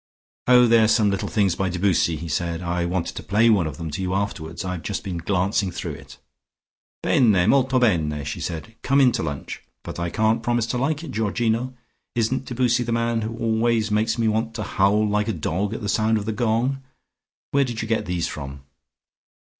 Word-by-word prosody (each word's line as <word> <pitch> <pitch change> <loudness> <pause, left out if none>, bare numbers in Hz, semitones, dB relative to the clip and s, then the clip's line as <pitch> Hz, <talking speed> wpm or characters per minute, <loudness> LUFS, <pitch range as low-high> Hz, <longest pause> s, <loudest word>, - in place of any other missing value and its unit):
"Oh, 125 0 +7
they 115 -1 +5
are 110 - +5
some 105 -2 +3
little 100 - -2
things 100 -5 +1
by 95 +2 -1
Debussy," 90 -2 +1
he 80 +2 -6
said. 85 +1 -2
"I 85 0 -1
want 85 -1 -1
to - - -7
play 110 +4 +3
one 95 -7 +3
of 75 -3 -6
them 80 -2 -5
to 75 - -4
you 95 0 -1
afterwards. 90 -3 -3
I've 90 -2 -3
just 100 - -4
been 95 -4 -4
glancing 95 +3 0
through 90 - -5
it." - - -11 0.9
"Bene, 105 -8 +4
molto 135 +1 +3
bene!" 80 - +1
said 80 +2 -4
she. 110 0 -21
"Come 135 +1 +2
in 130 -3 +6
to 115 -1 -2
lunch. 70 -2 -5 0.2
But - - -7
I 85 0 -1
can't 110 +3 +1
promise 120 -1 0
to 125 - -2
like 150 +4 -1
it, 155 - -7
Georgino. 115 +3 -1 0.4
Isn't 120 +3 0
Debussy 125 -1 +1
the 120 -1 -2
man 115 0 0
who 115 +1 -4
always 115 -1 +1
makes 110 +2 +1
me 115 -1 +1
want 110 +1 -1
to 110 - -3
howl 105 +2 +2
like 105 0 0
a 110 - 0
dog 95 +5 -2
at - - -6
the 105 - -3
sound 110 +2 +2
of 105 - -4
the 110 - -1
gong? 120 +5 0 0.7
Where 140 0 +3
did 120 -4 -3
you - - -4
get 110 -5 -1
these 90 -1 -1
from?" 70 -1 -7
110 Hz, 210 wpm, -23 LUFS, 90-115 Hz, 0.9 s, Oh